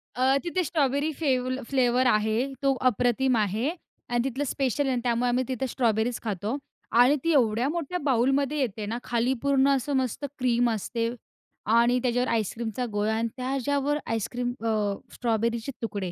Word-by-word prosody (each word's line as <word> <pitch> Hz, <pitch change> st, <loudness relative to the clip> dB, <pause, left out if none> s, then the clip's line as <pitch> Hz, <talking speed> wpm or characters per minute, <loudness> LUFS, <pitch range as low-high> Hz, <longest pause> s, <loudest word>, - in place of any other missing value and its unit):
अ, 260 Hz, +2 st, +3 dB
तिथे 360 Hz, +1 st, 0 dB
strawberry 285 Hz, -1 st, 0 dB
fave 260 Hz, -5 st, +1 dB, 0.2 s
flavour 255 Hz, -1 st, +3 dB
आहे. 220 Hz, +4 st, +1 dB
तो 275 Hz, -1 st, +4 dB, 0.2 s
अप्रतिम 245 Hz, +3 st, +1 dB
आहे 215 Hz, +6 st, 0 dB, 0.4 s
आणि 240 Hz, 0 st, +1 dB
तिथलं 270 Hz, +2 st, -2 dB
स्पेशल 270 Hz, +1 st, 0 dB
आहे 270 Hz, -, +1 dB
आणि 240 Hz, -, -1 dB
त्यामुळे 245 Hz, 0 st, +1 dB
आम्ही 250 Hz, +1 st, +1 dB
तिथे 260 Hz, 0 st, -2 dB
स्ट्रॉबेरीच 230 Hz, -1 st, 0 dB
खातो 210 Hz, +2 st, -2 dB, 0.5 s
आणि 270 Hz, +4 st, +5 dB
ती 335 Hz, -, +2 dB
एवढ्या 240 Hz, -2 st, +3 dB
मोठ्या 340 Hz, +2 st, -2 dB
बाऊलमध्ये 270 Hz, +2 st, +2 dB
येते 220 Hz, -5 st, -2 dB
ना. 225 Hz, +3 st, -3 dB
खाली 240 Hz, +2 st, +1 dB
पूर्ण 280 Hz, -1 st, +3 dB
असं 275 Hz, +2 st, -2 dB
मस्त 260 Hz, +2 st, -2 dB
क्रीम 245 Hz, -1 st, +2 dB
असते 230 Hz, +2 st, -2 dB, 0.7 s
आणि 240 Hz, +2 st, +4 dB
त्याच्यावर 245 Hz, 0 st, +1 dB
आईस्क्रीमचा 225 Hz, +2 st, -2 dB
गोळा 210 Hz, +1 st, 0 dB
आणि 230 Hz, +1 st, 0 dB
त्याच्यावर 275 Hz, +3 st, 0 dB
आईस्क्रीम 245 Hz, +2 st, -2 dB
अ, 210 Hz, -2 st, +1 dB, 0.2 s
स्ट्रॉबेरीचे 230 Hz, +1 st, -1 dB
तुकडे. 200 Hz, -5 st, -3 dB
245 Hz, 155 wpm, -26 LUFS, 230-270 Hz, 0.7 s, आणि